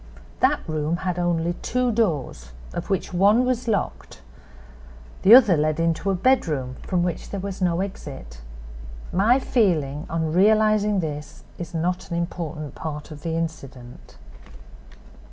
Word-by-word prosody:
That -, -, +2 dB
room 155 Hz, +1 st, -1 dB
had 180 Hz, -1 st, -1 dB
only 175 Hz, -1 st, 0 dB
two 250 Hz, 0 st, 0 dB
doors, 145 Hz, -, -1 dB, 0.2 s
of -, -, -5 dB
which 195 Hz, -1 st, -2 dB
one 205 Hz, +7 st, +4 dB
was 250 Hz, -1 st, -1 dB
locked; 205 Hz, -4 st, -3 dB, 1.0 s
the 215 Hz, +5 st, +9 dB
other 225 Hz, -9 st, +7 dB
led 155 Hz, +1 st, 0 dB
into 165 Hz, +3 st, 0 dB
a 195 Hz, -, +2 dB
bedroom, 165 Hz, -, +1 dB
from 180 Hz, -2 st, -1 dB
which 175 Hz, -2 st, -3 dB
there 200 Hz, -, -4 dB
was 195 Hz, 0 st, -6 dB
no 175 Hz, -1 st, +1 dB
exit. 135 Hz, -, -7 dB, 0.7 s
My 210 Hz, +8 st, +4 dB
feeling 165 Hz, -, 0 dB
on 160 Hz, -1 st, -1 dB
realizing 210 Hz, +1 st, +3 dB
this 150 Hz, -2 st, -6 dB, 0.2 s
is 175 Hz, 0 st, -6 dB
not 180 Hz, +3 st, -2 dB
an 170 Hz, -, -2 dB
important 160 Hz, -4 st, -4 dB
part 150 Hz, -1 st, -6 dB
of 150 Hz, -1 st, -9 dB
the 165 Hz, 0 st, -3 dB
incident. 135 Hz, -7 st, -7 dB
175 Hz, 140 wpm, -23 LUFS, 155-200 Hz, 1.0 s, the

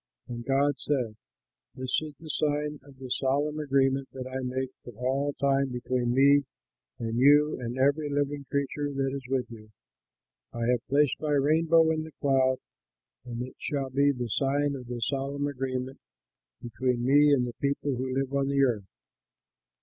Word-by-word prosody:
And 120 Hz, -1 st, -6 dB
God 140 Hz, +1 st, +1 dB
said, 125 Hz, -7 st, -1 dB, 0.6 s
"This 130 Hz, +3 st, -1 dB
is 155 Hz, -2 st, -8 dB
the 160 Hz, -, -11 dB
sign 150 Hz, 0 st, -1 dB
of 140 Hz, -2 st, -17 dB
the 130 Hz, -1 st, -9 dB
solemn 145 Hz, +3 st, 0 dB
agreement 135 Hz, -2 st, +1 dB
that 130 Hz, -1 st, -6 dB
I 130 Hz, +1 st, -4 dB
make 130 Hz, +1 st, -3 dB
for 120 Hz, -, -10 dB
all 135 Hz, +4 st, -1 dB
time 140 Hz, -1 st, +1 dB
between 125 Hz, 0 st, -1 dB
me 140 Hz, +1 st, +5 dB, 0.5 s
and 115 Hz, 0 st, -3 dB
you 145 Hz, +2 st, +5 dB
and 120 Hz, +1 st, -4 dB
every 145 Hz, +3 st, +2 dB
living 145 Hz, 0 st, -1 dB
creature 140 Hz, +1 st, -1 dB
that 135 Hz, -1 st, -1 dB
is 135 Hz, -2 st, -6 dB
with 130 Hz, -2 st, 0 dB
you: 110 Hz, -2 st, -11 dB, 0.8 s
I 115 Hz, 0 st, -2 dB
have 125 Hz, 0 st, -1 dB
placed 145 Hz, 0 st, +2 dB
my 150 Hz, -1 st, 0 dB
rainbow 160 Hz, +3 st, +4 dB
in 160 Hz, 0 st, 0 dB
the 160 Hz, -1 st, -10 dB
cloud 130 Hz, -2 st, +3 dB, 0.7 s
and 120 Hz, 0 st, -4 dB
it 130 Hz, -, -10 dB
shall 135 Hz, -2 st, -3 dB
be 140 Hz, +2 st, +3 dB
the 125 Hz, -3 st, -4 dB
sign 140 Hz, +4 st, +1 dB
of 125 Hz, -2 st, -8 dB
the 120 Hz, -1 st, -5 dB
solemn 140 Hz, +3 st, -1 dB
agreement 130 Hz, -1 st, -3 dB, 0.6 s
between 120 Hz, +1 st, -1 dB
me 145 Hz, +2 st, +6 dB
and 130 Hz, -3 st, +3 dB
the 120 Hz, -, -5 dB
people 140 Hz, -1 st, 0 dB
who 130 Hz, +1 st, -3 dB
live 135 Hz, 0 st, -1 dB
on 140 Hz, -1 st, +1 dB
the 140 Hz, 0 st, +2 dB
earth. 110 Hz, -7 st, 0 dB
135 Hz, 170 wpm, -28 LUFS, 125-145 Hz, 0.8 s, me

